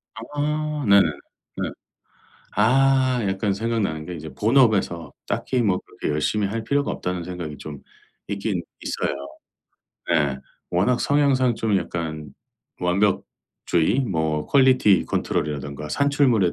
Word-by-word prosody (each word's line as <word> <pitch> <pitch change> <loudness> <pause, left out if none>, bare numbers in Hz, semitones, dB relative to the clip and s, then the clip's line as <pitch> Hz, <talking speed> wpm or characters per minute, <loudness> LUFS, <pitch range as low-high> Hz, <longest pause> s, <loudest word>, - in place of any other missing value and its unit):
아. 150 +4 -2
네네. 100 0 +7 0.6
네. - - -1 0.9
아. 130 +3 +4
약간 95 +1 0
생각나는 100 -8 -1
게 90 - -5
이제 80 -2 -8
본업에서 105 - +2 0.2
'딱히 125 -2 0
뭐 95 -4 +2
그렇게 - - -6
열심히 100 +7 0
할 110 +3 -3
필요가 140 +3 0
없다.'는 90 -1 -3
생각이 85 -5 -6
좀 75 -2 -8 0.5
있긴 100 -3 -2 0.2
있어요. - - -2 1.0
네. 70 -3 +2 0.3
워낙 100 +8 +2
성향상 135 -4 +3
좀 110 -3 +1
약간 80 -5 -4 0.5
완벽주의 90 +1 0
뭐 80 - -1
퀄리티 130 -9 +4
컨트롤 75 - -1
이라든가 75 0 -5
산출물에 135 - +2
100 Hz, 260 characters per minute, -23 LUFS, 85-130 Hz, 1.0 s, 네네